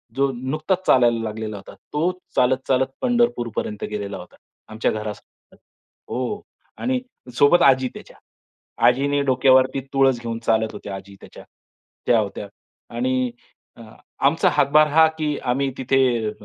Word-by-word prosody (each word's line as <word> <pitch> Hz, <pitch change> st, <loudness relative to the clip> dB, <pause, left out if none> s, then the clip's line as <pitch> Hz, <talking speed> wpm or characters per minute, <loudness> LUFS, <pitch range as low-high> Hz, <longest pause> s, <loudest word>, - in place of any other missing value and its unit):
जो 140 Hz, 0 st, +1 dB
नुकताच 155 Hz, +9 st, -2 dB
चालायला 120 Hz, -2 st, +4 dB
लागलेला 110 Hz, -1 st, -5 dB
होता. 100 Hz, -, -12 dB, 0.2 s
तो 160 Hz, +5 st, +1 dB, 0.2 s
चालत, 130 Hz, +1 st, +3 dB
चालत 130 Hz, 0 st, +2 dB
पंढरपूरपर्यंत 235 Hz, -, -1 dB
गेलेला 100 Hz, -1 st, -4 dB
होता. 90 Hz, -, -12 dB, 0.3 s
आमच्या 110 Hz, +1 st, -1 dB
घरासमोरून. 105 Hz, -1 st, -8 dB, 0.5 s
हो. 130 Hz, +12 st, -3 dB, 0.4 s
आणि 255 Hz, +1 st, -1 dB, 0.4 s
सोबत 160 Hz, +5 st, +5 dB
आजी 130 Hz, -1 st, +4 dB
त्याच्या. -, -, -12 dB, 0.7 s
आजीने 140 Hz, +3 st, +2 dB
डोक्यावरती 130 Hz, +1 st, +3 dB
तुळस 135 Hz, -2 st, +3 dB
घेऊन 115 Hz, -1 st, -4 dB
चालत 110 Hz, 0 st, +1 dB
होत्या 100 Hz, -, -7 dB
आजी 95 Hz, +1 st, -11 dB
त्याच्या. -, -, -13 dB, 0.6 s
त्या 115 Hz, -, +4 dB
होत्या. 100 Hz, -1 st, -4 dB, 0.5 s
आणि 130 Hz, 0 st, 0 dB, 0.5 s
अ, 115 Hz, -, -12 dB, 0.5 s
आमचा -, -, +2 dB
हातभार 155 Hz, +2 st, +4 dB
हा, 160 Hz, +2 st, +5 dB
की 150 Hz, -2 st, -1 dB
आम्ही 135 Hz, +2 st, 0 dB
तिथे 130 Hz, +1 st, 0 dB, 0.3 s
अ, 105 Hz, -, -2 dB
130 Hz, 135 wpm, -22 LUFS, 110-145 Hz, 0.7 s, सोबत